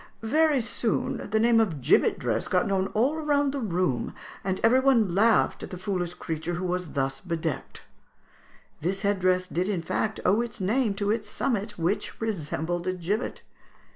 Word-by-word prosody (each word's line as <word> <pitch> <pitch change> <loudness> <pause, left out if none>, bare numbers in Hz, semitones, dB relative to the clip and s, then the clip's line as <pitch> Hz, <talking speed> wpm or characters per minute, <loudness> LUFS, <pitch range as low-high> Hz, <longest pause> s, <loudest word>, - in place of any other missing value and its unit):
Very 300 +3 +3
soon 225 -1 -1
the 220 +2 +2
name 230 0 +4
of 185 -10 +1
'gibbet 125 - +3
dress' - - -1
got - - +2
known 195 -1 +1
all 265 +8 +2
round 290 -2 +1
the 280 - -2
room, 180 - -1 0.3
and 190 0 -1
every 235 +3 +5
one 240 -9 +3
laughed 220 +4 +3
at - - -6
the 180 - -6
foolish 180 -2 -2
creature 160 +2 -4
who 180 +2 -3
was 180 -2 -2
thus 135 0 -1
bedecked." 165 -4 -4 1.0
This 190 +6 -2
head 200 -1 +1
dress 185 0 +2
did 180 +3 -1
in 185 -5 -1
fact 220 +4 -1
owe 200 +5 +4
its 235 -2 -5
name 215 +2 +1
to 205 0 0
its 215 -1 -2
summit, 210 -3 -2
which 175 +5 -2
resembled 175 -4 -2
a 185 - +1
gibbet. 190 +6 -3
195 Hz, 175 wpm, -27 LUFS, 175-225 Hz, 1.0 s, every